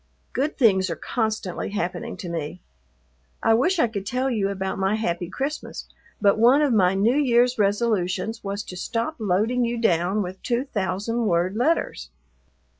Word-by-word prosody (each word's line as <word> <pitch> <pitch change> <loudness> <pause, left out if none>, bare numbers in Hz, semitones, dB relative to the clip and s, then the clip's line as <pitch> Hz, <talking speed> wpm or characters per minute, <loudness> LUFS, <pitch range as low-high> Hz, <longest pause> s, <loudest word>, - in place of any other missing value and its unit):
Good 280 +5 -1
things 190 -7 +4
are 165 - -2
constantly 220 -5 -2
happening 210 +3 -3
to 185 - -7
me. 165 0 -4 0.8
I 225 - +5
wish 310 +12 +2
I 315 - +4
could 205 -3 -5
tell 255 +3 0
you 205 -4 0
about 190 -1 -3
my 195 +2 +1
happy 175 -5 -2
Christmas, 275 +9 -4 0.3
but 205 0 +3
one 255 +6 +6
of 280 -5 +2
my 190 -3 +4
New 225 +7 +3
Year's 245 -3 +3
resolutions 205 0 0
was 200 +1 -3
to 180 - -9
stop 230 - -3
loading 220 +5 +1
you 235 0 -1
down 190 -1 +1
with 185 +1 -7
two 245 +2 -1
thousand 215 +1 -2
word 175 +1 +1
letters. 305 +9 0
215 Hz, 165 wpm, -24 LUFS, 190-240 Hz, 0.8 s, one